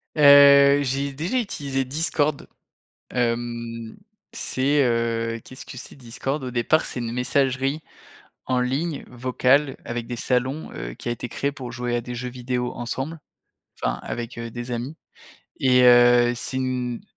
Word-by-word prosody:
Heu, 140 Hz, -1 st, +8 dB
j'ai 140 Hz, +1 st, -1 dB
déjà 165 Hz, -, -2 dB
utilisé 140 Hz, -, -2 dB
Discord. 150 Hz, +1 st, -1 dB, 0.6 s
Hem, 115 Hz, -1 st, -3 dB, 0.4 s
c'est, 140 Hz, +2 st, +1 dB
heu, 115 Hz, -1 st, 0 dB
qu'est-ce 130 Hz, -, -11 dB
que -, -, -10 dB
c'est 130 Hz, -, -10 dB
Discord? 135 Hz, +3 st, -4 dB
Au 125 Hz, -, -4 dB
départ 125 Hz, +7 st, +2 dB
c'est 125 Hz, -, -5 dB
une 115 Hz, -1 st, -3 dB
messagerie, 135 Hz, +3 st, 0 dB, 0.7 s
en 125 Hz, -1 st, +1 dB
ligne, 140 Hz, +5 st, -2 dB
vocale, 130 Hz, +3 st, +1 dB
avec 120 Hz, -1 st, -4 dB
des 120 Hz, -, -5 dB
salons, 130 Hz, +5 st, -1 dB
heu, -, -, -6 dB
qui -, -, -7 dB
a -, -, +1 dB
été 120 Hz, +1 st, -6 dB
créée 140 Hz, 0 st, -2 dB
pour 125 Hz, -5 st, -8 dB
jouer 120 Hz, -1 st, -2 dB
à -, -, 0 dB
des 125 Hz, +1 st, -6 dB
jeux 125 Hz, +1 st, -4 dB
vidéo 125 Hz, 0 st, -3 dB
ensemble, 135 Hz, +6 st, -4 dB, 0.6 s
enfin -, -, -1 dB
avec, 120 Hz, 0 st, -5 dB
heu, 115 Hz, 0 st, -5 dB
des 120 Hz, +2 st, -7 dB
amis. 125 Hz, +6 st, -4 dB, 0.6 s
Et 125 Hz, -1 st, +4 dB
heu, 120 Hz, 0 st, +6 dB
c'est 130 Hz, +2 st, -4 dB
une 125 Hz, -2 st, -2 dB
125 Hz, 155 wpm, -23 LUFS, 120-140 Hz, 0.7 s, Heu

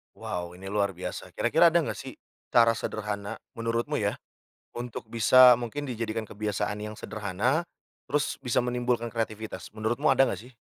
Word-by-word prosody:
Wow! 90 Hz, 0 st, -5 dB
Ini 95 Hz, +2 st, -8 dB
luar 100 Hz, -3 st, 0 dB
biasa, 90 Hz, -, -6 dB
kira-kira 170 Hz, -, +5 dB
ada 170 Hz, 0 st, +3 dB
enggak -, -, -4 dB
sih, 135 Hz, -1 st, -7 dB, 0.4 s
cara 115 Hz, -1 st, +7 dB
sederhana, 105 Hz, 0 st, -4 dB, 0.2 s
menurutmu 115 Hz, +5 st, -1 dB
ya, 100 Hz, -1 st, 0 dB, 0.6 s
untuk 120 Hz, -2 st, -6 dB
bisa 125 Hz, +3 st, +7 dB
mungkin 125 Hz, +5 st, -4 dB
dijadikan 115 Hz, -2 st, -3 dB
kebiasaan 105 Hz, 0 st, -2 dB
yang 105 Hz, 0 st, -6 dB
sederhana, 110 Hz, -, -1 dB, 0.5 s
terus 145 Hz, 0 st, +1 dB
bisa 125 Hz, -3 st, +1 dB
menimbulkan 125 Hz, -1 st, 0 dB
kreativitas, 110 Hz, -1 st, -4 dB
menurutmu 120 Hz, +7 st, +1 dB
ada 135 Hz, -, +5 dB
enggak 125 Hz, +1 st, -5 dB
sih? 120 Hz, -, -26 dB
115 Hz, 150 wpm, -28 LUFS, 105-125 Hz, 0.6 s, cara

